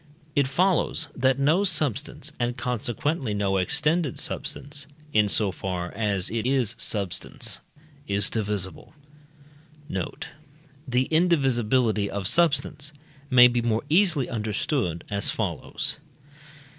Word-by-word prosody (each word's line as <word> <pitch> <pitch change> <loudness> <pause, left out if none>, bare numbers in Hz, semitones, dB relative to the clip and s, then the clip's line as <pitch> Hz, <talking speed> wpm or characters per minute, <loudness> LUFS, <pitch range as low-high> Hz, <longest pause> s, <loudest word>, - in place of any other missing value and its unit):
It 140 -2 +3
follows, 165 0 +1
that 130 0 +2
no 155 +8 +3
substance, 155 - -1
and 120 +1 -1
consequently 125 +1 -2
no 100 -1 +1
extended 150 - +1
substance, 140 0 -4 0.3
in 105 -1 +4
so 100 -1 +2
far 90 -2 -4
as 100 -4 0
it 115 +1 -1
is 130 -5 +2
substance, 100 -5 -1 0.5
is 100 0 +1
divisible. 105 - -2 0.9
Note. 160 - -4 0.6
The 125 0 +2
indivisibility 130 - +2
of 100 -2 -1
substance 145 -2 +1 0.4
may 125 -2 +8
be 120 0 0
more 115 -1 0
easily 165 -7 +4
understood 110 - -2
as 100 0 +2
follows. 85 - -2
120 Hz, 110 wpm, -25 LUFS, 105-145 Hz, 0.9 s, may